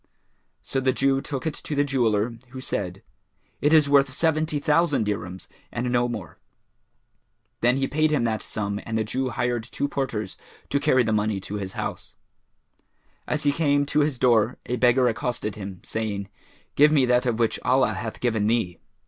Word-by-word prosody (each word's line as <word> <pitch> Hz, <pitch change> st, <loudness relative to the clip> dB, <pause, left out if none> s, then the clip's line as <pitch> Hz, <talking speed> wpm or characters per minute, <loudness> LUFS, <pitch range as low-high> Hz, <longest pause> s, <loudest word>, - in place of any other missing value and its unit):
So 135 Hz, -, -2 dB
the 130 Hz, -1 st, +2 dB
Jew 135 Hz, +1 st, +2 dB
took 135 Hz, 0 st, -5 dB
it 160 Hz, -, -1 dB
to 150 Hz, -, -5 dB
the 145 Hz, -, +3 dB
jeweller, 115 Hz, -4 st, 0 dB
who 130 Hz, +1 st, -8 dB
said, 95 Hz, -7 st, -4 dB, 0.6 s
"It 150 Hz, -, +3 dB
is 155 Hz, -2 st, +6 dB
worth 140 Hz, -1 st, +4 dB
seventy 155 Hz, +1 st, 0 dB
thousand 150 Hz, -3 st, +2 dB
dirhams 95 Hz, -3 st, -4 dB, 0.2 s
and 120 Hz, +1 st, -2 dB
no 120 Hz, 0 st, +2 dB
more." 105 Hz, -7 st, -7 dB, 1.2 s
Then 125 Hz, +2 st, +3 dB
he 135 Hz, 0 st, 0 dB
paid 155 Hz, +2 st, +2 dB
him 150 Hz, -5 st, +1 dB
that 110 Hz, -2 st, 0 dB
sum 100 Hz, -1 st, -3 dB
and 110 Hz, 0 st, -3 dB
the 110 Hz, -, +1 dB
Jew 130 Hz, +4 st, -2 dB
hired 120 Hz, -1 st, -1 dB
two 135 Hz, +4 st, -3 dB
porters 120 Hz, -8 st, -3 dB, 0.3 s
to 140 Hz, -, +2 dB
carry 135 Hz, -3 st, +3 dB
the 110 Hz, -1 st, 0 dB
money 105 Hz, -1 st, 0 dB
to 105 Hz, +2 st, -5 dB
his 95 Hz, -2 st, -5 dB
house. -, -, -5 dB, 1.1 s
As 150 Hz, -, -1 dB
he 145 Hz, -, +4 dB
came 145 Hz, -2 st, +2 dB
to 145 Hz, +1 st, +1 dB
his 145 Hz, -3 st, +1 dB
door, 120 Hz, -2 st, +3 dB
a 125 Hz, -, -2 dB
beggar 125 Hz, +1 st, +4 dB
accosted 120 Hz, -2 st, -2 dB
him, 95 Hz, -3 st, -8 dB
saying, 100 Hz, -3 st, -3 dB, 0.5 s
"Give 150 Hz, +2 st, +6 dB
me 145 Hz, -4 st, +4 dB
of 125 Hz, -, +1 dB
that 125 Hz, -1 st, +2 dB
which 115 Hz, -1 st, +1 dB
Allah 130 Hz, -4 st, +3 dB
hath 110 Hz, +3 st, -5 dB
given 110 Hz, -4 st, +1 dB
thee." 110 Hz, -6 st, 0 dB
125 Hz, 180 wpm, -25 LUFS, 110-140 Hz, 1.2 s, is